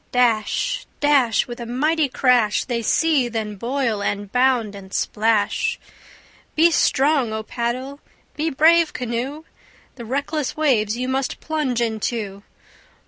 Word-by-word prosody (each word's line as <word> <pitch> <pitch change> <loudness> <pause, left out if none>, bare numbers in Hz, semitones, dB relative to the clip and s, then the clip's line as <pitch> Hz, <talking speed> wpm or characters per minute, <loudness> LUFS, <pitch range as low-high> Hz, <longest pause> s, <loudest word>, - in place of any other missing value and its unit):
Dash, 250 - +1
dash, 275 -7 +3
With 240 0 -8
a 235 - -5
mighty 300 +5 +1
crash, 245 -5 +2
They 240 -2 -2
seethe, 265 -2 +1
and 210 -2 -3
boil, 240 -3 -1
and 205 0 -3
bound, 250 -4 +2
and 195 -1 -11
splash. 220 - 0 0.8
Be 330 +2 +5
strong, 275 -5 +2
O 220 0 -3
paddle! 255 +5 -4 0.4
be 310 +2 -1
brave, 320 +3 +4
canoe! 250 +5 -4 0.5
The 235 - -8
reckless 280 +4 -2
waves 235 -8 +1
you 255 +1 -2
must 265 0 -2
plunge 295 -7 -1
into. 220 -3 -2
250 Hz, 130 wpm, -21 LUFS, 225-290 Hz, 0.8 s, Be